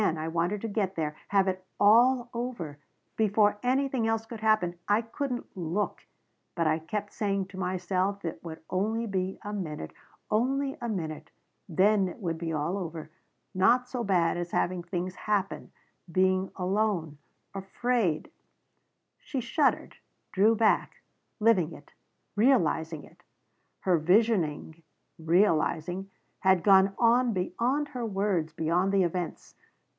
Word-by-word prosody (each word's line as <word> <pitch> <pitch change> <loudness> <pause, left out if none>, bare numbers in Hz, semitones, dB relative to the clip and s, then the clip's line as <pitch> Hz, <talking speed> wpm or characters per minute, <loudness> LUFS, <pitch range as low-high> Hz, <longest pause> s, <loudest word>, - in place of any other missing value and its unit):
I 160 -4 0
wanted 170 +5 -1
to 225 - -3
get 200 -3 -1
there. 150 -2 -2
Have 195 -1 +3
it 185 0 -2 0.2
all 240 +4 +5
over 235 - -5 0.4
before 210 -1 +3
anything 260 -2 +1
else 225 0 0
could 225 0 -8
happen. 215 -5 +2
I 210 +3 +3
couldn't 245 +1 -5
look 180 +3 -3 0.5
but 170 - 0
I 155 +1 +2
kept 205 +6 -5
saying 200 -2 -1
to 190 - -11
myself 185 +1 -1
it 165 - -4
would 160 -2 -8
only 220 +5 0
be 190 -3 -2
a 210 - -5
minute 155 - -5 0.4
only 270 +5 +1
a 235 - -3
minute 160 -7 -4 0.4
then 195 +3 +3
it 180 - -7
would 165 -6 -3
be 165 -1 -3
all 160 +5 -1
over 160 -3 -6 0.4
not 235 +7 +3
so 250 -1 -3
bad 175 -5 +2
as 175 0 -3
having 180 0 0
things 180 +1 -4
happen 200 0 -2 0.4
being 185 +1 +2
alone 185 -5 -1 0.3
afraid 195 -2 -1 0.5
" - - -50
She 270 - -4
shuddered 260 +5 0 0.3
drew 210 +4 +4
back 220 -1 +1 0.4
living 195 -7 +3
it 145 - -14 0.4
realizing 165 - +2
it. - - -18 0.6
Her 180 -3 +2
visioning 170 -4 +1 0.4
realizing 170 +1 +1 0.3
had 190 -2 +3
gone 195 -1 +5
on 240 0 +3
beyond 250 +10 -1
her 250 -4 -5
words, 195 -6 0
beyond 175 +4 +1
the 195 -1 +3
events. 175 0 -4
195 Hz, 140 wpm, -28 LUFS, 170-220 Hz, 0.6 s, all